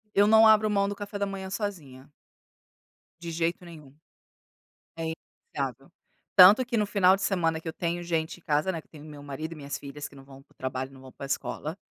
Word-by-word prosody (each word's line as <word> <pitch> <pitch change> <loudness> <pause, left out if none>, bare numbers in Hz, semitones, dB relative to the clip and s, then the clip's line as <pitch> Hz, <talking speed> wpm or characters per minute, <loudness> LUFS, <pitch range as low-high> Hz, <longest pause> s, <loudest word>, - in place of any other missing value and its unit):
Eu 205 +1 +5
não 220 +1 +7
abro 215 0 +5
mão 200 -1 +1
do 205 - -4
café 205 0 -6
da 200 - 0
manhã 195 -1 -6
sozinha. 150 - -6 1.1
De 170 -1 -6
jeito 170 +2 -1
nenhum. 155 -5 -13 1.0
É 165 -1 -2 0.4
inegociável. - - -4 0.4
Tanto 200 +7 +9
que 240 -1 -1
no 210 - +2
final 195 -2 +4
de 195 - -8
semana 170 -5 +1
que 165 - -10
eu 160 - -3
tenho 170 +1 -2
gente 165 -1 -2
em - - -29
casa, 150 +4 +1
né, 165 -3 -5
que - - -32
eu - - -58
tenho 150 -1 -12
meu 150 -2 -10
marido 155 +3 -6
e - - -12
minhas 140 -2 -5
filhas 145 +1 -7
que 140 - -18
não 135 - -13
vão 135 0 -14
para - - -29
o - - -48
trabalho, 130 0 -4
não 135 -1 -15
vão 130 0 -12
para 140 - -8
escola. 150 +4 -4
165 Hz, 225 wpm, -27 LUFS, 145-195 Hz, 1.1 s, Tanto